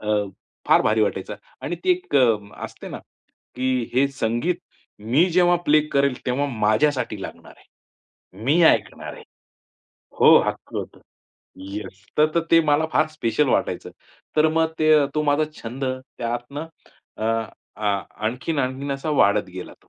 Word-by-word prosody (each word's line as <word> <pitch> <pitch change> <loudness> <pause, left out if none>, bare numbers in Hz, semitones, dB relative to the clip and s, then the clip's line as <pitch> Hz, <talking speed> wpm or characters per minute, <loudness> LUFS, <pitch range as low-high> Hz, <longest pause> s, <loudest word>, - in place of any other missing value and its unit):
अ, 105 0 -1 0.5
फार - - +5
भारी 110 +1 +2
वाटायचं - - -2 0.3
आणि 175 +4 -3
ती 370 - +3
एक 365 +1 -1
अ, 120 -4 +5 0.3
असते - - -9
ना, - - -6 0.6
की 130 -1 0
हे 135 +2 +4
संगीत 135 +6 -1 0.4
मी 130 - +3
जेव्हा 175 0 +4
प्ले 155 +1 +6
करेल 140 -1 +2
तेव्हा 130 +3 0
माझ्यासाठी 110 0 +1
लागणार - - -9 0.6
आहे. 95 +4 -18
मी 155 +7 +3
ऐकणार - - +2
आहे - - -12 1.0
हो, - - +8
हक्क - - -5
होतं, - - -5 0.6
येस. 100 +1 -8
तर 150 - +6
तर 170 - +3
ते 165 - +7
मला 150 +2 +3
फार 155 +1 +3
स्पेशल 150 -2 0
वाटायचं. - - -1 0.5
तर 155 +1 +5
मग 160 0 +1
ते 155 0 +5
अ, 145 -2 +4
तो 150 - +1
माझा 145 +1 +2 0.2
छंद 125 +4 -5
त्यातनं 130 +2 -4 0.5
अ, 110 - -4 0.5
अ, 105 - -3 0.4
आणखीन-आणखीन 130 +2 -2
असा 135 +3 -3
वाढत 100 -8 +3
गेला 90 -1 -8
तो. - - -30
135 Hz, 150 wpm, -23 LUFS, 115-155 Hz, 1.0 s, हो